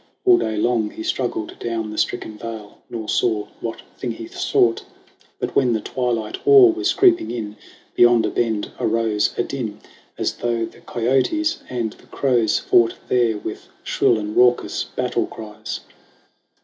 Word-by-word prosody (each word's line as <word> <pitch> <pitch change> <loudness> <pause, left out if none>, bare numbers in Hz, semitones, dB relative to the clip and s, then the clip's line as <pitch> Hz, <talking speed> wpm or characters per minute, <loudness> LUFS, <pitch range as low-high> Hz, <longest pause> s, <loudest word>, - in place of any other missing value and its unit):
All 365 -2 +6
day 110 - -2
long 110 -1 +1
He 110 - -8
struggled 120 -4 -3
down 115 -2 -3
the 105 - -7
stricken 110 - -2
vale, 110 -1 -8
nor 110 -2 -5
saw 110 -3 +1
What 115 - -5 0.2
thing 125 - -3
he 115 0 -8
sought. 115 +1 +1 0.5
But - - -4
when 125 -3 +3
the 110 - +1
twilight 115 -3 -2
awe 405 -3 +8
Was 340 - 0
creeping 350 -4 +4
in, 105 -3 -5 0.4
beyond 120 -2 +5
a - - -1
bend 110 -3 -1
arose 110 -2 +1
A - - +2
din 120 -7 -4 0.4
as - - -2
though 120 -1 -1
the - - -14
kiotes 135 - 0
and 120 -4 -2
the - - -21
crows 120 -5 +1
Fought 115 -1 +3
there 120 -3 +2
with - - -7 0.2
shrill 115 - +2
and 105 0 -4
raucous 125 0 +3
battle - - -2
cries. 110 0 -7
115 Hz, 160 wpm, -21 LUFS, 110-125 Hz, 0.5 s, awe